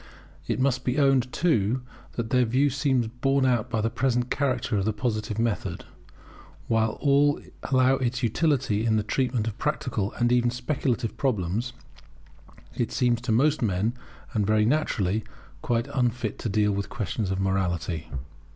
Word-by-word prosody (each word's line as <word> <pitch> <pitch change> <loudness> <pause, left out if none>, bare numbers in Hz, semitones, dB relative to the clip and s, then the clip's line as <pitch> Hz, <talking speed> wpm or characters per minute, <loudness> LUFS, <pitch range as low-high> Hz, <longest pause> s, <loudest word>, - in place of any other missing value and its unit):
It 115 -1 -1
must 130 -1 +1
be 125 +2 -1
owned, 135 -3 +3
too, 125 - +1 0.3
that 115 -1 -4
their 125 -1 +4
view 130 +5 +2
seems 135 -3 +1
borne 130 +4 +1
out 120 -4 +1
by 110 - 0
the 115 - +1
present 125 0 0
character 130 -4 0
of 100 -1 0
the 110 - +1
Positive 110 -1 -2
method. 115 -5 -2 0.8
While 110 -1 +2
all 145 0 +3 0.3
allow 130 0 +4
its 125 0 -2
utility 120 -3 +1
in 110 -1 +2
the 105 - +1
treatment 125 0 0
of 115 +2 -5
practical, 120 -8 -1
and 120 0 +1
even 120 -1 +3
of 120 - -4
speculative, 125 -3 -1
problems, 115 -2 -1 1.0
it - - -2
seems 120 -1 +1
to 125 -1 -2
most 145 +7 +3
men, 105 +1 +1 0.4
and 105 - +1
very 110 0 +3
naturally, 110 -7 +1 0.4
quite 120 -4 0
unfit 120 -4 -1
to 115 - -2
deal 105 0 +2
with 100 0 -2
questions 105 -3 -3
of 95 0 -1
morality. 90 -4 -1
120 Hz, 160 wpm, -26 LUFS, 110-130 Hz, 1.0 s, their